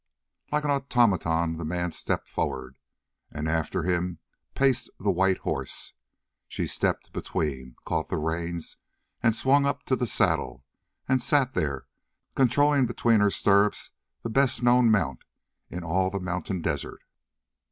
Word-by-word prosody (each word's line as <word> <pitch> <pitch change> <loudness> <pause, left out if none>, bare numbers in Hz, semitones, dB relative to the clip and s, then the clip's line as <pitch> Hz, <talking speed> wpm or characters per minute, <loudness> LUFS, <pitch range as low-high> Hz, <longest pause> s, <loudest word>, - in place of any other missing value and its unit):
Like 150 0 +1
an 145 - +1
automaton 95 - +2
the 85 - -5
man 85 +2 -2
stepped - - -3
forward, 65 -2 -4 0.5
and 75 +1 -4
after 80 0 -1
him 90 0 -1 0.4
paced 135 -3 +2
the 100 - +1
white 95 +1 +2
horse. - - -4 0.5
She - - -3
stepped - - -2
between, 65 -5 -3
caught - - -2
the - - -1
reins, 85 +2 -3 0.4
and 115 -2 +3
swung 140 +4 +3
up 140 0 -2
to 130 - +1
the 125 -1 -1
saddle, 65 - 0 0.4
and 130 -1 +2
sat 130 0 +2
there, 70 -3 -2 0.5
controlling 135 +1 +3
between 115 -1 +2
her 105 0 +4
stirrups 100 +1 +2 0.3
the 115 - -3
best 130 0 +2
known 120 -1 +5
mount 80 - +1 0.5
in 90 0 -6
all 95 +3 +1
the 100 +1 -3
mountain 90 -1 -3
desert. - - -3
95 Hz, 140 wpm, -27 LUFS, 80-125 Hz, 0.5 s, known